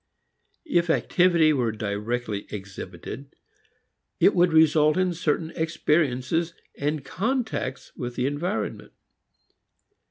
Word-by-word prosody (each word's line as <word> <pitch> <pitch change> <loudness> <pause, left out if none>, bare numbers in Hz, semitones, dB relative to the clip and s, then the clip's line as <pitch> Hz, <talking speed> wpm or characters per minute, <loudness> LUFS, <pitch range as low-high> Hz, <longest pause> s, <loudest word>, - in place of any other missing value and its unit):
If 175 - +1
activity 170 -1 +3
were 125 -5 +1
directly 105 +1 -3
exhibited 100 +6 -8 0.8
it - - +5
would 175 0 +4
result 155 0 +5
in 185 -1 +2
certain 160 -1 -1
experiences, 160 -1 0 0.5
contacts 220 - -2
with 120 -1 -5
the 125 - 0
environment. 155 +9 -3
155 Hz, 90 wpm, -25 LUFS, 120-170 Hz, 0.8 s, it